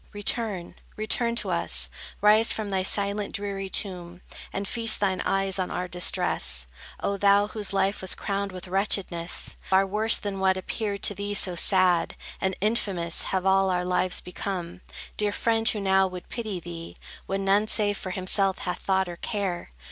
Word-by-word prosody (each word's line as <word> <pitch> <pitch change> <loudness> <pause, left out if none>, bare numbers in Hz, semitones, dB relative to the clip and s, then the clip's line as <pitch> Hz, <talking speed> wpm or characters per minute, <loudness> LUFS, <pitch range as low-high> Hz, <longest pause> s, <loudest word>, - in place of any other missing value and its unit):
Return, 205 -3 -2 0.2
return 235 +2 +1
to - - -1
us, - - +1 0.3
Rise 215 +2 +6
from 210 -2 -2
thy 190 -1 +1
silent, 200 +2 -1
dreary 200 -2 -3
tomb, 180 -3 -3 0.3
And 195 0 -3
feast 230 0 +2
thine 190 -2 +1
eyes 195 0 +1
on 185 - -1
our 180 - -3
distress, 65 - +1 0.4
O 200 - 0
thou, 200 +1 +4
whose 210 -2 -3
life 195 0 +1
was 190 - -1
crowned 200 -1 -2
with 185 0 -8
wretchedness! 185 -3 -1
Far 190 +1 +3
worse 215 +3 +2
than 200 -2 -4
what 190 0 +3
appeared 200 +1 -3
to - - +2
thee 205 +1 -3
so 185 -2 +4
sad 180 -1 +3 0.3
And 190 -1 0
infamous, 195 -6 0
have 190 -1 -1
all 195 0 +4
our 180 -1 0
lives 180 0 +1
become. 180 -1 -5 0.4
Dear 210 -1 +1
friend, 225 +2 +1
who 215 - -1
now 190 -1 +3
would 180 -1 -9
pity 215 -6 -4
thee, 170 -1 -8 0.3
When 195 0 -2
none 200 +2 +3
save 205 -2 +1
for 185 - -5
himself 190 +1 +2
hath 180 - -2
thought 190 -1 +1
or 175 -1 -7
care? 195 -4 -3
195 Hz, 170 wpm, -26 LUFS, 185-205 Hz, 0.4 s, Rise